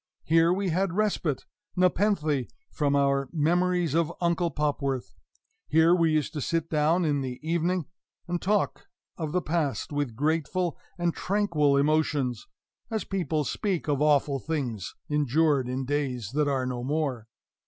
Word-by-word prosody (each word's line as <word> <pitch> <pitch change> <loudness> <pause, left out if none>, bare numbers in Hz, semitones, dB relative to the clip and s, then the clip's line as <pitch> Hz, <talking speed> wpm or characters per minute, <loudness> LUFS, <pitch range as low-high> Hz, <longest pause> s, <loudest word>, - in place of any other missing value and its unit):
Here 165 +1 +4
we 190 +1 0
had 185 +1 0
respite, 190 -8 0 0.3
nepenthe 180 - +1 0.2
from 145 -2 +1
our 140 -1 +2
memories 175 0 +1
of 165 0 +2
Uncle 170 0 +1
Popworth; 140 -3 -2 0.5
here 160 +2 +5
we 165 -3 +3
used 155 0 0
to 150 - -3
sit 165 +3 -1
down 160 +3 +2
in 145 -2 +1
the 130 -2 -5
evening 170 +1 0 0.4
and 175 0 -2
talk 205 +1 0 0.3
of 155 -3 -4
the 180 +1 0
past 150 -8 -1
with 145 -6 -2
grateful 160 +5 0 0.2
and 175 -1 0
tranquil 165 -8 +1
emotions, 145 -5 +1 0.4
as 220 -2 -2
people 170 -6 -1
speak 185 +5 -2
of 145 -1 0
awful 145 -2 +3
things 125 - -3
endured 150 -2 +2
in 130 +1 -2
days 130 -6 -2
that 150 +1 +1
are 135 -2 0
no 125 -1 -3
more. 135 -5 -2
155 Hz, 145 wpm, -27 LUFS, 140-170 Hz, 0.5 s, here